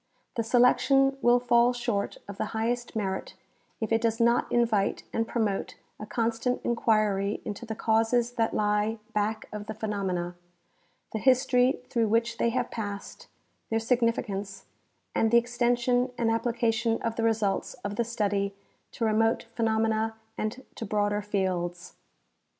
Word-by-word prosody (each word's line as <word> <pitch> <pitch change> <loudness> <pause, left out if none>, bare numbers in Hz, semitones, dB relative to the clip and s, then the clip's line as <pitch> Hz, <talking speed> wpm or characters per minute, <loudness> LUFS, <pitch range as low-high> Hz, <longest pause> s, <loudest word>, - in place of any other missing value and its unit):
The 230 - +1
selection 260 +3 +4
will 245 0 +5
fall 240 0 +4
short 235 -4 -2
of 200 -1 -9
the - - 0
highest 240 +2 -1
merit 190 -3 -3 0.4
if 220 - -3
it 225 0 +3
does 225 0 0
not 235 +1 +3
invite 225 -4 +1
and 225 0 0
promote 215 -5 -1 0.2
a 215 - -7
constant 230 +2 0
inquiry 215 -4 +1
into 220 +3 -6
the 220 - -4
causes 225 +2 +2
that 225 -2 0
lie 210 +1 +1 0.2
back 215 +1 -1
of 210 -1 -6
the 220 - -5
phenomena, 190 -5 -2 0.8
the 220 - -1
history 255 0 +3
through 230 -3 +1
which 230 +2 +1
they 235 - +3
have 245 +1 -1
passed, 205 -3 -6 0.4
their 225 - +1
significance, 225 -5 -1 0.5
and 225 - +2
the 235 - +6
extension 245 +1 +2
and 225 -1 +1
application 230 0 +1
of 230 -1 -1
the - - -2
results 215 -3 0
of 205 0 -3
the 235 - +1
study 200 -3 -1 0.4
to 230 - -1
remote 225 +2 +2
phenomena 220 -1 +1 0.2
and 230 +5 -4
to - - -5
broader 205 0 0
fields. 180 -3 -2
225 Hz, 145 wpm, -28 LUFS, 210-235 Hz, 0.8 s, the